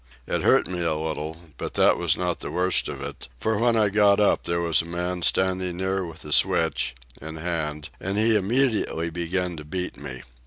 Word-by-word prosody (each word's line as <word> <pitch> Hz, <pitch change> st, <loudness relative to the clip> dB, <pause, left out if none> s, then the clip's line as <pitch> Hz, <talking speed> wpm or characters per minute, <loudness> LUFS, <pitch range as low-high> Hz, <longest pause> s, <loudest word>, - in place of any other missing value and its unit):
It -, -, -1 dB
hurt -, -, +4 dB
me 90 Hz, -1 st, -4 dB
a 80 Hz, -2 st, +1 dB
little, 80 Hz, 0 st, -4 dB, 0.2 s
but -, -, -5 dB
that -, -, +5 dB
was 85 Hz, -2 st, +1 dB
not 90 Hz, -1 st, -1 dB
the -, -, -5 dB
worst 90 Hz, +1 st, +1 dB
of 70 Hz, -1 st, -6 dB
it, 70 Hz, -2 st, -7 dB
for 110 Hz, -1 st, 0 dB
when 120 Hz, 0 st, +3 dB
I 105 Hz, -2 st, +4 dB
got 100 Hz, 0 st, +4 dB
up 105 Hz, -, +3 dB
there 85 Hz, 0 st, 0 dB
was 85 Hz, -2 st, +3 dB
a -, -, -9 dB
man 90 Hz, +1 st, -3 dB
standing 95 Hz, 0 st, +1 dB
near 95 Hz, +1 st, -1 dB
with 80 Hz, -3 st, -9 dB
a 75 Hz, -, -7 dB
switch, 60 Hz, -, +2 dB, 0.3 s
in 80 Hz, +2 st, -7 dB
hand, 80 Hz, -2 st, -3 dB
and 95 Hz, +2 st, -3 dB
he 110 Hz, +1 st, +4 dB
immediately 105 Hz, -6 st, +1 dB
began 90 Hz, +1 st, -2 dB
to 75 Hz, -, -7 dB
beat 90 Hz, +4 st, -4 dB
me. -, -, -7 dB
90 Hz, 205 wpm, -25 LUFS, 80-95 Hz, 0.3 s, that